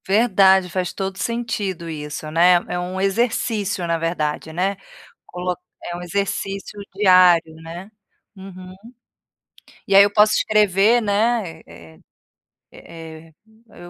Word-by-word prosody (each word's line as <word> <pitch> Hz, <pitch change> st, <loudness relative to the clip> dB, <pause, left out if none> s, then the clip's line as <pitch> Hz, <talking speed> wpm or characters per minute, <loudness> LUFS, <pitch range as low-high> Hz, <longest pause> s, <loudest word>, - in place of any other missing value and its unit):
Verdade. 190 Hz, -3 st, +3 dB
Faz 180 Hz, 0 st, -3 dB
todo 195 Hz, -1 st, -5 dB
sentido 210 Hz, -7 st, -3 dB
isso, 150 Hz, -1 st, -6 dB
né. 175 Hz, +3 st, +5 dB
É 180 Hz, -, -3 dB
um 180 Hz, +1 st, -5 dB
exercício, 205 Hz, -2 st, -1 dB
na 170 Hz, 0 st, 0 dB
verdade, 160 Hz, -2 st, -3 dB
né. 185 Hz, +4 st, -2 dB, 0.5 s
Colo 180 Hz, 0 st, -4 dB, 0.3 s
é 175 Hz, -, -6 dB
um -, -, -8 dB
exercício 195 Hz, +2 st, -4 dB, 0.2 s
diário, 180 Hz, -5 st, +4 dB
né. 165 Hz, +5 st, -10 dB, 0.4 s
Uhum. 185 Hz, -1 st, -11 dB, 1.1 s
E 195 Hz, -, +2 dB
aí 200 Hz, -, +9 dB
eu 200 Hz, -, +1 dB
posso 210 Hz, +1 st, +4 dB
escrever, 210 Hz, +2 st, +3 dB
né, 205 Hz, -5 st, -1 dB
eh 80 Hz, -1 st, -16 dB, 0.8 s
eh 165 Hz, -1 st, -12 dB
eh, -, -, -39 dB, 0.4 s
eu -, -, -19 dB
185 Hz, 125 wpm, -20 LUFS, 170-200 Hz, 1.1 s, aí